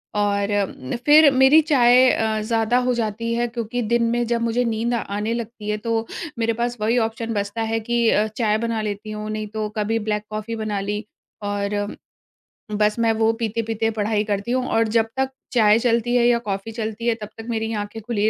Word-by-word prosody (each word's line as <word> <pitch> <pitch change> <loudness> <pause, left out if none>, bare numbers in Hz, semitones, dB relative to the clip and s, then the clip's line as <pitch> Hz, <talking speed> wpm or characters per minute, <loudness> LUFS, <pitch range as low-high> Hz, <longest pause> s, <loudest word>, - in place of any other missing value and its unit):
और 205 0 +1
उम, 130 -8 -6
फिर 300 0 +8
मेरी 265 +4 +6
चाय 255 -4 +5
अ, 220 -1 0
ज़्यादा 225 +2 +1
हो 250 - +3
जाती 230 0 -2
है 240 +1 0
क्योंकि 235 +1 -3
दिन 235 +1 +1
में 240 0 +1
जब 235 0 0
मुझे 235 +1 +1
नींद 230 +1 -1
आने 215 -1 -2
लगती 230 -2 -5
है 210 - 0
तो 225 +1 -1 0.3
मेरे 230 0 +1
पास 240 0 -1
वही 225 +3 +2
ऑप्शन 225 +1 -5
बचता 205 +1 -2
है 225 - +1
कि 235 +1 +1
अ, 210 0 +2
चाय 215 -1 0
बना 230 -1 -2
लेती 210 0 -4
हूँ, 215 0 -5
नहीं 215 0 -3
तो 215 0 -3
कभी 220 +2 0
ब्लैक 210 -1 -2
कॉफी 215 +2 -4
बना 215 -2 -2
ली 205 +2 -3 0.4
और 205 0 -2 0.8
बस 210 0 +2
मैं 230 -1 +3
वो 225 0 +2
पीते-पीते 225 0 -1
पढ़ाई 210 -1 0
करती 205 +2 -2
हूँ 255 0 +1
और 225 0 +2
जब 225 -1 +3
तक 265 0 +1 0.2
चाय 220 -2 +5
चलती 235 0 +1
है 240 -1 +4
या 240 -1 +4
कॉफी 195 +2 -3
चलती 220 +1 -4
है 235 - +4
तब 210 - -6
तक 225 - -8
मेरी 225 -1 -2
आँखें 210 +1 -5
खुली 215 -1 0
225 Hz, 205 wpm, -22 LUFS, 210-235 Hz, 0.8 s, फिर